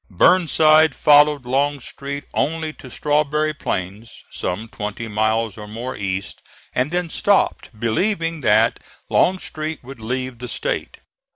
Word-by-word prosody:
Burnside 155 - +4
followed 145 -2 +5
Longstreet 140 +1 -2
only 160 +1 -1
to 130 - -12
Strawberry 150 +3 0
Plains, 105 -3 -4 0.2
some 100 +5 -4
twenty 105 +1 -5
miles 110 0 0
or 105 - -8
more 115 +4 -5
east, 100 0 -4 0.3
and 130 +3 +1
then 175 +1 -1
stopped, 200 +4 +1
believing 165 - 0
that 130 - +3 0.3
Longstreet 160 -4 0
would 135 0 -10
leave 125 +2 -4
the 125 - -6
State. - - -3
135 Hz, 120 wpm, -21 LUFS, 110-155 Hz, 0.3 s, followed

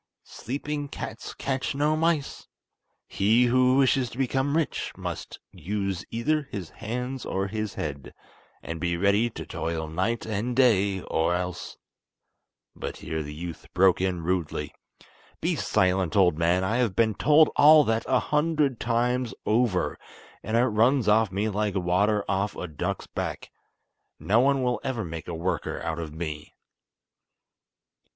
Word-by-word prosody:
Sleeping 145 +3 -4
cats - - -7
catch 135 0 -2
no 150 +2 +2
mice. 160 -3 -1 0.6
He 110 +5 +3
who 130 +1 +4
wishes 135 -2 +3
to - - -11
become 135 +3 0
rich 160 -4 -1
must - - -6
use 100 +1 -3
either 145 +5 -1
his 95 -6 -6
hands 125 +3 -5
or 95 +1 -2
his 105 0 -4
head, 70 -1 -5 0.5
and 85 0 -5
be 85 +1 -1
ready 100 +5 +3
to - - -8
toil 80 -1 -3
night 95 +9 -1
and 110 +3 -2
day, 100 -7 +3
or 80 +1 0
else—" 90 0 -4 1.0
But - - -6
here 80 0 -4
the 75 -1 -6
youth 85 +1 -8
broke 95 0 +4
in 90 -3 -1
rudely: 90 -2 -2 0.7
"Be - - 0
silent, 95 -1 +1
old 90 -5 +4
man! 85 +3 +2
I 110 +5 0
have 120 -7 +1
been 110 -2 +3
told 150 +8 +5
all 150 +1 +8
that 115 -3 0
a 130 - +3
hundred 150 -4 +1
times 120 +1 0
over; 110 -4 +1 0.4
and 110 +1 -1
it 120 - +4
runs 115 +2 +2
off 105 -1 +4
me 100 +3 -1
like 105 -1 -1
water 100 +3 +1
off 100 +1 -1
a 90 - -5
duck's 75 -3 -4
back. - - -5 0.7
No 110 +4 +2
one 135 +1 +3
will 125 -3 0
ever 120 -6 -2
make 80 0 -7
a 85 - -4
worker 85 0 -2
out 80 0 -3
of 80 -2 -5
me." 75 -2 -6
105 Hz, 150 wpm, -26 LUFS, 90-125 Hz, 1.0 s, all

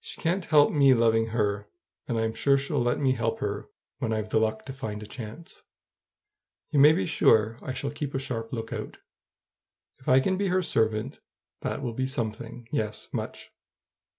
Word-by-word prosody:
She - - -7
can't 175 +2 0
help 150 -2 +5
me 140 -3 +5
loving 115 -1 +3
her, 105 -2 -1 0.4
and 120 - -1
I'm 110 0 0
sure 125 +5 +3
she'll 140 0 -1
let 120 0 +1
me 135 -2 +3
help 115 -3 -1
her - - -3 0.3
when 115 - -1
I've 110 -1 -2
the 110 - +3
luck 110 0 -1
to 135 - -6
find 105 -5 -5
a - - -8
chance. 115 +8 -9 1.1
You 145 - +3
may 145 +2 +9
be 165 - +1
sure 115 -8 +3
I 130 - -4
shall 140 +2 -3
keep 145 -1 -5
a - - +2
sharp 120 -4 -4
lookout. 115 -2 -5 1.0
If 130 - -5
I 130 +1 +7
can 185 +8 +1
be 200 0 0
her 185 0 +2
servant, 110 -1 0 0.4
that - - -3
will 120 -3 -2
be 130 +3 -1
something; 120 -2 -4
yes, 105 -1 -2
much. - - -5
120 Hz, 185 wpm, -27 LUFS, 110-140 Hz, 1.1 s, may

